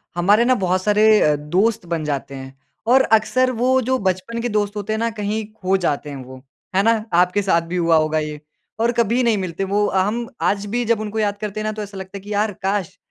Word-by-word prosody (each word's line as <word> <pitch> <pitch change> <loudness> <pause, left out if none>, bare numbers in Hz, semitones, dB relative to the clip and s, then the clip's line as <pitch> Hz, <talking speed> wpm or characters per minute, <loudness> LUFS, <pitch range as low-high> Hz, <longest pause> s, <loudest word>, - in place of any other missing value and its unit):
हमारे 205 +7 +3
ना 255 +1 +4
बहुत 185 +1 +1
सारे 215 +1 +4
अ, 150 -1 +3
दोस्त 180 +9 0
बन 170 -2 -3
जाते 140 -2 -3
हैं। 135 0 -10 0.3
और 260 +3 +6
अक्सर 255 +4 +2
वो 255 +2 +2
जो 260 +2 0
बचपन 190 +4 -2
के 240 - -2
दोस्त 210 -1 -1
होते 210 +1 -3
हैं - - -1
ना 230 0 0
कहीं 210 +1 -2
खो 190 -3 0
जाते 150 -5 -2
हैं 140 - -7
वो। 130 +1 -12 0.3
है 195 - +4
ना? 225 -1 +2
आपके 180 +3 +3
साथ 185 -4 +2
भी 175 - -4
हुआ 170 -1 +3
होगा 155 0 +1
ये 150 -1 -5 0.4
और 230 +1 +2
कभी 235 +1 +1
नहीं 230 -3 +2
मिलते 185 -1 -3
वो 200 +2 +1
अ, 195 - -1
हम 230 +4 -2
आज 200 0 0
भी 240 +4 -1
जब 230 -1 +1
उनको 215 0 -4
याद 205 -1 0
करते 210 0 -5
हैं 215 - -3
ना 215 - 0
तो 215 - -6
ऐसा 200 -1 -8
लगता 190 +1 -7
है - - -10
कि 205 +2 -7
यार 210 +1 0
काश 195 -2 -2
205 Hz, 245 wpm, -20 LUFS, 180-220 Hz, 0.4 s, और